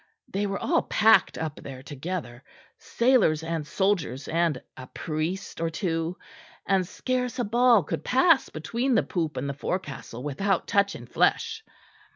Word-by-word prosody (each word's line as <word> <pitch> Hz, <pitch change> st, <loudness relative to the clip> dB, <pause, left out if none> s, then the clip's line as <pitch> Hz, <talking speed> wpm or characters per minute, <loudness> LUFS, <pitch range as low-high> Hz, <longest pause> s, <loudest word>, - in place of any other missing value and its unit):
They 200 Hz, +2 st, -1 dB
were 195 Hz, 0 st, -2 dB
all -, -, +1 dB
packed 220 Hz, +1 st, +4 dB
up 155 Hz, -2 st, -4 dB
there 130 Hz, -2 st, -9 dB
together 145 Hz, -3 st, -6 dB, 0.4 s
sailors 235 Hz, -, +2 dB
and 165 Hz, -2 st, -3 dB
soldiers 170 Hz, -, 0 dB
and 165 Hz, -4 st, +1 dB, 0.2 s
a 130 Hz, -1 st, -9 dB
priest 165 Hz, +7 st, -4 dB
or 165 Hz, -, +1 dB
two; 165 Hz, 0 st, -2 dB, 0.5 s
and 190 Hz, -2 st, +2 dB
scarce 250 Hz, +3 st, -2 dB
a 245 Hz, -, 0 dB
ball 235 Hz, -1 st, +4 dB
could -, -, -4 dB
pass 270 Hz, +3 st, +4 dB
between 235 Hz, -, -1 dB
the 220 Hz, -, +4 dB
poop 160 Hz, -5 st, -2 dB
and 140 Hz, -, -2 dB
the 140 Hz, -, -2 dB
forecastle 140 Hz, -6 st, -5 dB
without 185 Hz, +7 st, 0 dB
touching 200 Hz, 0 st, +1 dB
flesh." 450 Hz, -1 st, +1 dB
175 Hz, 150 wpm, -26 LUFS, 155-220 Hz, 0.5 s, packed